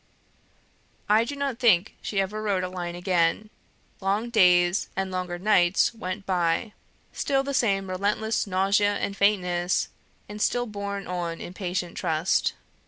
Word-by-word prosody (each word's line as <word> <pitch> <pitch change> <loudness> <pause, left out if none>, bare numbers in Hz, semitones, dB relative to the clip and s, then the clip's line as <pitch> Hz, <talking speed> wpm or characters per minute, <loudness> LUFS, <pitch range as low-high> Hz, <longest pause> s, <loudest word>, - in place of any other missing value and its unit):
I 215 +2 +4
do 285 - -5
not 280 -4 -3
think 210 -6 +3
she 200 - -2
ever 200 +3 -2
wrote 200 -4 0
a 185 - -3
line 175 -1 -5
again. 180 +3 0 0.5
Long 205 +5 -1
days 180 -4 +4
and 190 0 -2
longer 180 -1 -3
nights 185 0 +3
went 195 -2 -5
by; 180 +4 0 0.4
still 270 -1 0
the 280 0 -3
same 195 -7 +1
relentless 205 +4 -1
nausea 200 +2 +2
and 200 - -3
faintness, 180 -3 +1 0.4
and 210 +1 -7
still 245 +2 +1
borne 200 -2 -5
on 175 -2 -4
in 175 - -8
patient 180 -2 -4
trust. 160 +3 +1
195 Hz, 145 wpm, -26 LUFS, 180-215 Hz, 0.5 s, I